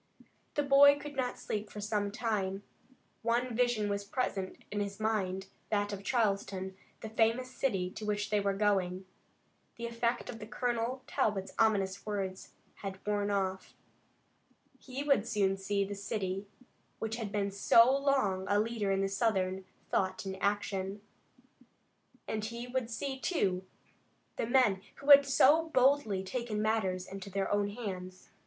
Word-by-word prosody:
The 290 - +2
boy 285 +1 +7
could 290 0 -8
not 255 -2 -1
sleep 210 0 -4
for 210 - -8
some 205 -1 -1
time. 200 -3 -2 0.6
One 235 +1 0
vision 240 -3 +2
was 200 0 -1
present 200 -3 -2
in 205 - -2
his 200 -1 -3
mind, 195 -4 -1 0.2
that 205 -1 0
of 200 0 -6
Charleston, 195 -4 0 0.3
the 220 - -6
famous 230 +3 +1
city 195 -9 -1
to 215 - -7
which 210 0 -1
they 210 - +3
were 200 -1 0
going. 190 -2 +1 0.7
The 235 - -5
effect 235 +1 -1
of 225 - -7
Colonel 245 +2 -1
Talbot's 195 -3 -1
ominous 200 -3 +2
words 195 -3 -4 0.3
had 195 -1 -6
worn 205 -1 0
off. 190 -1 -2 1.0
He 265 +2 -5
would 275 -7 +2
soon 200 -4 +2
see 200 +1 0
the 200 - -5
city 195 -1 -3 0.5
which 225 +1 -3
had 220 -4 -4
been 200 -1 -1
so 230 +6 +6
long 265 -10 +1
a 205 +1 +3
leader 220 -2 -1
in 195 0 +1
Southern 190 -3 0 0.3
thought 190 0 0
and 190 0 -3
action, 200 -1 -1 1.3
and 215 -1 -2
he 235 +2 -5
would 250 -1 -2
see, 265 +3 -4
too, 190 - 0 0.7
the - - -1
men 240 -7 +3
who 280 +1 +2
had 280 0 +10
so 300 +4 +5
boldly 255 -8 +3
taken 230 +1 -3
matters 200 -4 0
in 195 +1 -8
their 195 0 -3
own 205 0 +2
hands. 185 -4 -7
210 Hz, 150 wpm, -32 LUFS, 195-235 Hz, 1.3 s, had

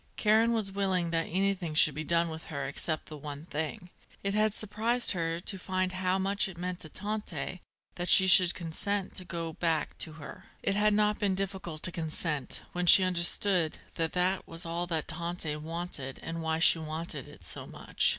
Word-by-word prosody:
Karen 220 +2 +4
was 220 -4 -1
willing 190 -3 0
that 165 -1 0
anything 190 -3 -1
should 155 0 +7
be 155 +3 -4
done 170 +1 +2
with 160 0 -7
her 140 -3 -4
except 155 +3 -2
the 155 - -9
one 145 +1 -8
thing. 160 +2 -5 0.3
It 200 0 -1
had 215 +1 +2
surprised 220 +4 +2
her 165 -2 -1
to 190 +2 -2
find 185 0 -1
how 185 0 0
much 195 +1 +1
it 190 -3 -9
meant 180 0 -4
to 155 - -9
Tante 205 -1 -4 0.3
that 175 0 -4
she 190 - +7
should 185 -2 +7
consent 190 +4 -3
to 185 - -3
go 165 -2 -4
back 160 -2 -1
to 160 - 0
her. 155 -3 -10 0.2
It - - +1
had 210 +1 +3
not 210 0 +2
been 195 -2 +1
difficult 190 -5 -5
to 185 - +1
consent, 160 -3 -3
when 180 0 -2
she 185 - +10
understood 180 -1 +1 0.2
that 165 -1 -2
that 185 +1 0
was 165 +1 -6
all 170 +1 -2
that 160 -3 -1
Tante 170 -2 -3
wanted 155 -4 -5
and 165 0 -4
why 160 0 0
she 165 0 +5
wanted 155 -2 -4
it - - -14
so - - -6
much. - - +1
175 Hz, 195 wpm, -30 LUFS, 160-195 Hz, 0.3 s, she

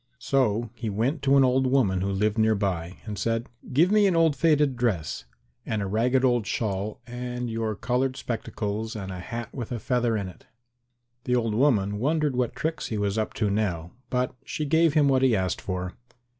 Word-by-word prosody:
So 120 -4 +1
he 120 -2 -4
went 120 +9 -1
to 140 0 +4
an 135 - +6
old 130 0 +3
woman 115 -9 +2
who 100 +1 -1
lived 105 +2 0
near 110 0 +4
by 90 -3 -2
and 105 -3 -5
said, 115 +4 -1 0.2
"Give 165 +9 +4
me 210 -1 +5
an 185 - +2
old 165 -3 +4
faded 150 -4 +3
dress 100 - -1 0.4
and 110 - -2
a 100 - -2
ragged 125 +6 +2
old 120 -4 +2
shawl 105 -1 -2
and 125 0 -4
your 110 -1 -2
coloured 130 +4 -1
spectacles 110 -1 -4
and 95 -3 -5
a 90 - -6
hat 115 +6 -6
with 120 -4 -6
a 120 - -1
feather 120 -1 0
in 100 -2 -3
it." 90 - -13 0.8
The 125 - +2
old 115 -3 0
woman 105 -5 +2
wondered 150 +1 +1
what 125 -2 -1
tricks 160 +1 -2
he 110 - -3
was 105 +1 0
up 110 - -2
to 105 -3 0
now, 90 -5 -1 0.2
but 125 0 0
she 155 - -3
gave 160 +1 +3
him 150 -2 +5
what 135 -1 +3
he 130 -4 +4
asked 95 -2 -1
for. 90 -1 -4
115 Hz, 200 wpm, -26 LUFS, 105-130 Hz, 0.8 s, an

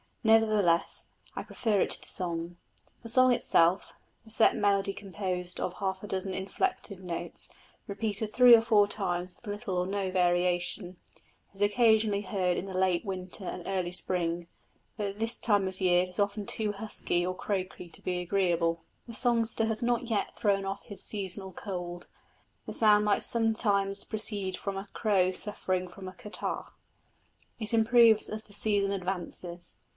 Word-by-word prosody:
Nevertheless 215 -6 +3 0.3
I - - -4
prefer 215 -4 0
it - - +1
to - - -1
the - - -16
song. 170 -1 -4 0.5
The 230 - -8
song 255 +2 +5
itself 175 -4 +2 0.3
the 220 - -15
set 220 0 +4
melody 200 -1 +2
composed 185 -3 -4
of 180 - -2
half 190 -1 -3
a - - -6
dozen 190 -1 -2
inflected 195 - -2
notes, 170 -2 -4 0.4
repeated 210 +1 -3
three 245 -1 +9
or 225 - +4
four 215 -3 +4
times 180 -3 -3
with 240 - -18
little 205 -2 -3
or 180 0 0
no 195 -1 -2
variation 175 0 0 0.6
is 195 - -9
occasionally 215 -1 +3
heard 185 -3 0
in - - -3
the 190 -1 -7
late 185 -2 +2
winter 185 0 -4
and 180 - -5
early 185 -2 -1
spring, 175 -1 -1 0.5
but 205 -2 -1
at 200 +1 -7
this 225 +1 +1
time 205 -4 +2
of 190 0 -6
the 190 - -2
year 180 0 +5
it 185 - -6
is 180 - -7
often 205 0 0
too 215 -2 -1
husky 200 -4 -1
or 185 0 -2
croaky 185 -3 -4
to - - -10
be 180 -1 -2
agreeable. 170 -3 0 0.2
The 230 - -7
songster 230 -2 +2
has 225 +2 -1
not 240 0 +1
yet 220 -3 -1
thrown 200 -2 +1
off 195 +1 -4
his 200 -2 -4
seasonal 190 -2 -4
cold; 175 -2 -6 0.6
the - - -6
sound 210 -1 +5
might 205 -1 +2
sometimes 205 -4 +1
proceed 205 -3 -1
from 200 -1 -4
a 195 +1 -6
crow 190 -4 +2
suffering 185 -1 -2
from 185 +1 -10
a 185 - -7
catarrh. 210 +3 -3 0.9
It 220 0 -2
improves 225 -1 +5
as 215 0 -5
the 205 - -19
season 205 -1 +1
advances. 180 -2 -5
195 Hz, 170 wpm, -29 LUFS, 180-215 Hz, 0.9 s, three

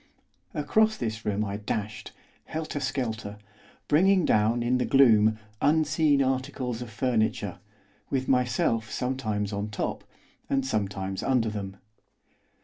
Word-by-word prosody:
Across 220 -1 +2
this 110 -2 -4
room 105 +1 0
I 100 0 -3
dashed, 105 0 -4 0.3
helter 155 -2 -4
skelter, 115 -7 -3 0.5
bringing 185 +4 +4
down, 110 +3 +2
in 125 +2 +1
the - - +1
gloom, 110 -5 +5 0.2
unseen 150 -1 +3
articles 130 -2 -2
of 120 - -6
furniture, 110 -4 -1 0.5
with 130 -1 -1
myself 120 -3 +1
sometimes 110 -5 -2
on 100 +1 -3
top, 100 - -3 0.5
and 135 -1 +1
sometimes 95 -5 -2
under 125 -4 +1
them. 100 -2 -6
120 Hz, 120 wpm, -27 LUFS, 105-135 Hz, 0.5 s, gloom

